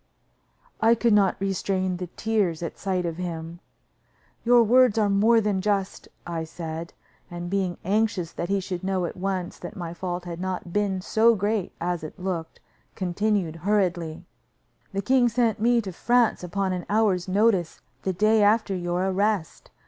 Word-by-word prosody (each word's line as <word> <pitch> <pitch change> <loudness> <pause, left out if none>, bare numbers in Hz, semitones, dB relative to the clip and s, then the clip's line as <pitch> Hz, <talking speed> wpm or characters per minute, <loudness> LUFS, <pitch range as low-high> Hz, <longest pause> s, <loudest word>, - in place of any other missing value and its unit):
I 225 +1 +5
could 235 -1 +2
not 200 -3 +3
restrain 190 -1 -1
the 180 0 -5
tears 200 -7 0
at 170 - -6
sight 185 -2 -1
of 165 -1 -3
him. 170 -1 -5 0.8
"Your 240 0 +6
words 245 0 +4
are 210 -2 +3
more 220 +4 +4
than 205 -3 0
just," 200 -1 -1 0.2
I 170 -2 -3
said; 160 0 -6 0.4
and, 175 0 -6
being 190 -3 -1
anxious 200 -4 0
that 170 +2 -4
he 200 0 +2
should 180 -1 -5
know 190 -2 0
at - - -5
once 185 -1 -3
that 180 +4 -8
my 170 -4 -5
fault 175 0 -4
had 175 0 -6
not 185 -2 -4
been 200 -2 0
so 225 +4 +4
great 205 -1 -1
as 175 -1 -2
it 155 - -8
looked, 180 -3 -4 0.4
continued 185 -2 -1
hurriedly: 175 -4 0 0.7
"The 195 0 -3
king 255 0 +4
sent 230 -2 +1
me 235 +1 +4
to 195 -3 -6
France 240 +2 +2
upon 190 +1 -1
an 180 -1 -5
hour's 205 -4 +2
notice, 195 -3 +2 0.2
the 190 - -1
day 215 +4 +3
after 210 -1 +3
your 175 +1 -1
arrest. 195 -3 -1
190 Hz, 165 wpm, -25 LUFS, 175-210 Hz, 0.8 s, Your